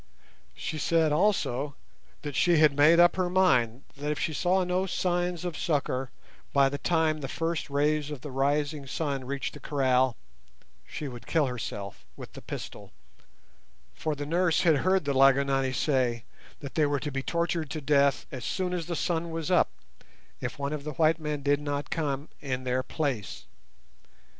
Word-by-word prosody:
She 155 - -4
said 160 0 +2
also 150 -5 +1 0.5
that 145 -2 -5
she 170 +5 +4
had 150 -2 +5
made 155 +4 +6
up 175 +1 +6
her 185 -1 +1
mind 130 -10 +2
that 145 +1 -4
if 150 - -1
she 160 - -1
saw 185 +4 +2
no 180 +1 0
signs 175 -1 -1
of 175 -3 -3
succour 135 -5 -1 0.4
by 140 -1 +5
the 140 +1 -4
time 160 -1 +1
the 135 - -3
first 165 +2 -2
rays 150 +1 +1
of 145 -4 -6
the 145 - -7
rising 145 +2 0
sun 140 -2 -2
reached 140 +1 -3
the - - -10
kraal 130 -3 +1 0.7
she 150 - -5
would 120 -3 -9
kill 160 -3 +2
herself 110 -6 -5
with - - -10
the - - -10
pistol, - - -8 1.0
for 150 - -2
the 145 0 -5
nurse 170 +2 +2
had 160 -5 +4
heard 185 +3 +2
the 140 - 0
Lygonani 135 0 +4
say 125 -4 0 0.4
that 140 -2 -7
they 155 -2 +3
were 145 -1 0
to 145 - -4
be 135 0 -2
tortured 170 0 -1
to 155 - -4
death 140 -3 +2
as 130 -3 -6
soon 185 -1 -2
as 170 -2 -3
the 170 - -2
sun 170 0 -1
was 165 +1 -3
up 180 - +4 0.7
if - - -4
one 140 +1 -2
of 150 -2 -4
the 150 0 -5
white 160 +2 +3
men 150 -2 -3
did 145 0 +2
not 145 0 -3
come 145 -2 -2
in 130 -2 -3
their 130 0 0
place. 130 - -3
145 Hz, 180 wpm, -28 LUFS, 135-165 Hz, 1.0 s, made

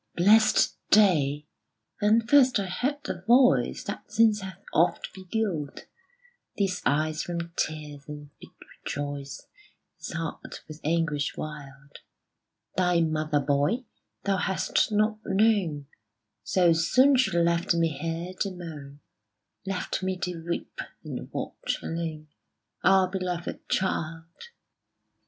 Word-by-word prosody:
Blest 210 +5 +4
day! 150 -9 +4 0.6
Then 215 +2 +4
first 255 -2 +5
I 200 - -1
heard 250 +11 -1
the - - -5
voice 250 +2 +4
That - - -7
since 220 -2 +4
hath 190 0 -9
oft 170 +2 +1
beguiled 185 -6 -3 0.8
These 195 -3 0
eyes 155 +2 +1
from 170 -1 -5
tears, 150 -2 -4
and 150 -1 -9
bid - - -13 0.3
rejoice 145 -1 -5 0.5
This - - -7
heart 165 -1 -6
with 155 0 -10
anguish 155 -2 0
wild 145 -2 -8 0.8
Thy 180 -2 +2
mother, 155 -2 0
boy, 145 - +1 0.4
thou 195 -1 +1
hast 190 +2 0
not 215 +1 +1
known; 190 -8 +1 0.6
So 175 -3 +3
soon 255 +12 +4
she 195 -9 +2
left 170 +1 +2
me 165 -1 +2
here 165 +4 -4
to 200 - 0
moan 150 -6 -9 0.7
Left 195 0 -2
me 185 0 -2
to 175 -3 -4
weep 170 +1 -5 0.2
and - - -7
watch, - - -3
alone, 160 -2 -4 0.6
Our 190 0 +6
one 185 +1 -2
beloved 180 -2 -5
child. 165 -3 -1
170 Hz, 120 wpm, -27 LUFS, 155-195 Hz, 0.8 s, Our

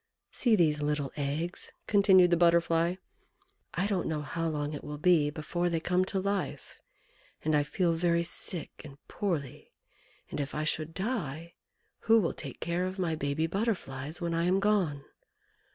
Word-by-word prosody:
"See 235 -4 +3
these 155 -6 +2
little 145 -2 -1
eggs," 150 +5 -3
continued 190 -3 +5
the - - +6
Butterfly; 170 0 +3 0.8
"I 180 - +1
don't 200 -4 0
know 155 -2 -2
how 165 +2 -2
long 150 -1 -2
it 145 - -6
will 150 0 -6
be 155 -2 +4
before 170 +3 -2
they 165 -1 0
come 180 +3 +1
to 190 0 -2
life, 200 0 -3 0.6
and 155 -1 +3
I 145 - +4
feel 170 +4 0
very 170 0 +2
sick 170 0 -6
and 140 -2 -11
poorly, 160 -10 -3 0.6
and - - -4
if 145 0 -3
I 150 - -1
should 155 +1 -2
die, 170 - -3 0.5
who 225 0 +5
will 175 - 0
take - - -8
care 175 +2 -1
of 185 +1 -6
my 175 -4 0
baby 145 +1 -1
Butterflies 165 - -3
when 170 -1 -2
I 165 +1 +1
am 185 +2 +3
gone? 190 -9 +1
170 Hz, 170 wpm, -30 LUFS, 150-185 Hz, 0.8 s, the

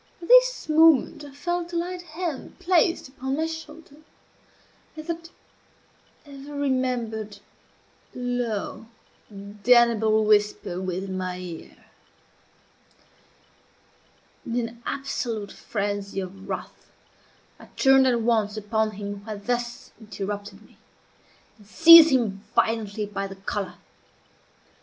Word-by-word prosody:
At 340 - -10
this - - +5
moment 315 -3 +4
I 290 - -10
felt 345 +4 -4
a - - -3
light 355 +1 -3
hand 335 -3 -6
placed 360 -3 +1
upon 265 +1 -4
my 320 - 0
shoulder, 320 -2 -9 1.0
and 310 0 -8
that 335 0 -5 1.0
ever 285 0 -10
remembered, 245 -6 -2 0.8
low, 245 -3 -3 0.4
damnable 215 +2 +2
whisper 205 -3 +1
within 190 +1 -4
my 185 -1 -4
ear. 175 -3 -10 2.6
In 235 - -5
an 235 +1 -15
absolute 235 -6 -3
frenzy 200 -2 -4
of 190 +1 -8
wrath, - - -7 0.7
I - - -13
turned 270 -1 +5
at 240 -2 +2
once 220 -2 +1
upon 215 +1 -1
him 205 0 -6
who 200 - -18
had 210 -2 -7
thus 240 -1 -3
interrupted 205 -1 -6
me, - - -23 0.8
and 205 - -19
seized 330 +6 +9
him 220 -8 0
violently 215 -2 0
by 200 -1 -4
the 195 - -10
collar. 195 0 -4
230 Hz, 110 wpm, -25 LUFS, 205-290 Hz, 2.6 s, seized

